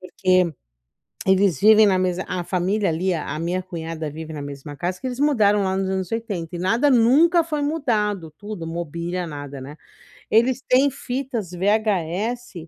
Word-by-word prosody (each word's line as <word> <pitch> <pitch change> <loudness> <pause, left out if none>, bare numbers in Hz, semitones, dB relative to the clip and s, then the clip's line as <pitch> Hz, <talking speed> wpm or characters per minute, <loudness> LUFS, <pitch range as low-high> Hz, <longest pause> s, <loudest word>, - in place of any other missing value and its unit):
Porque 185 -1 +1 0.7
eles 190 -5 +3
vivem 215 0 +7
na 190 -2 +3
mesma 185 0 -1
a 180 -1 -2
família 190 +3 0
ali 180 +3 0
a 155 -1 -4
minha 175 +3 -2
cunhada 165 -3 -5
vive 160 +2 -8
na 145 - -5
mesma 145 +1 -8
casa 180 +5 -3
que 265 - -5
eles 255 0 -4
mudaram 215 -9 +3
lá 190 0 0
nos 190 0 -1
anos 190 -1 -3
80, 200 -8 -4
e - - -6
nada 225 +11 +2
nunca 295 +8 +5
foi 300 -3 -2
mudado. 210 - -1
Tudo, 205 -5 -7
mobília, 170 +2 -4
nada, 145 -3 -7
né. 145 +4 -9 0.5
Eles 245 +4 +3
têm 270 +2 +3
fitas 250 -6 -4
VHS 205 +4 -1
190 Hz, 165 wpm, -22 LUFS, 170-225 Hz, 0.7 s, vivem